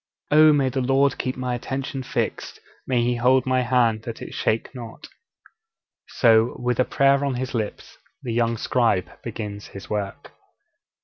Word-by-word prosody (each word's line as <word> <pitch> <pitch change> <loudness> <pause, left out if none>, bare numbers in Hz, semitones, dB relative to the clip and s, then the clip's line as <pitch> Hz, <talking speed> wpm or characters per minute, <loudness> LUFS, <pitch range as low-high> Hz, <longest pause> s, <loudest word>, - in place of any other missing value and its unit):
'Oh, 155 +1 +7
may 140 -3 +2
the 130 +1 -2
Lord 135 +2 +2
keep 130 0 -2
my 125 -1 -2
attention 135 +3 -4
fixed, 125 - -3 0.3
may 125 -2 +1
He 120 0 0
hold 125 +2 +3
my 130 -1 +2
hand 120 -3 +2
that 115 0 -7
it - - -8
shake 110 +4 -1
not!' 120 -3 -9 1.0
So, 115 -1 +3
with 125 -1 -1
a 130 - +4
prayer 140 0 +3
on 140 -2 -1
his 130 +1 -4
lips, 110 -4 -5 0.2
the 120 - -3
young 115 0 +1
scribe 115 -6 0
begins 105 -3 -6
his 100 - -11
work. 100 -2 -4
125 Hz, 165 wpm, -23 LUFS, 115-130 Hz, 1.0 s, Oh